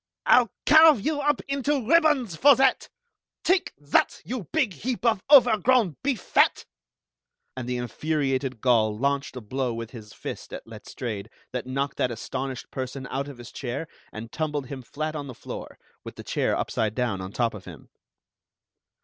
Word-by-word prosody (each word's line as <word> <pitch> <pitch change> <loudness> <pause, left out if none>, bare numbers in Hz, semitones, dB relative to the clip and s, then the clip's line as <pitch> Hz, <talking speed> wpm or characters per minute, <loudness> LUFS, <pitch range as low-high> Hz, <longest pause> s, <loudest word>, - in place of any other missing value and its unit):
"I'll 245 -3 +5 0.2
carve 315 -5 +7
you 300 -2 0
up 295 +1 +1
into 275 -3 -1
ribbons 295 - +3
for 280 - +7
that! 265 +1 +2 0.5
Take 370 0 +2
that, 145 +1 +1
you 235 -6 -5
big 275 -11 +1
heap 245 +4 -4
of 220 -5 +3
over 245 -7 +7
grown 235 - +3
beef 270 -5 0
fat!" - - +2 0.9
And 125 -1 -5
the 125 - -1
infuriated 135 -1 -2
Gaul 110 -4 +3
launched 140 +2 -1
a 125 - -6
blow 125 +2 -2
with 115 0 -6
his 110 -4 -11
fist - - -8
at - - -7
Letstrayed 110 -1 -7 0.2
that 125 0 -4
knocked 140 +2 -2
that 125 - +1
astonished 130 +3 -5
person 130 +1 -5
out 135 +1 -2
of 140 -3 -9
his 120 -1 -11
chair 135 +5 -4 0.2
and 115 +1 -8
tumbled 150 -3 -2
him 135 -2 -6
flat 155 +5 -4
on 145 -2 -5
the 130 - -8
floor, - - -8 0.3
with - - -9
the - - -9
chair - - 0
upside 110 -1 -1
down 120 -7 -1
on 95 +1 -6
top 115 +1 0
of 105 -3 -10
him. 80 -7 -12
140 Hz, 175 wpm, -26 LUFS, -, 0.9 s, carve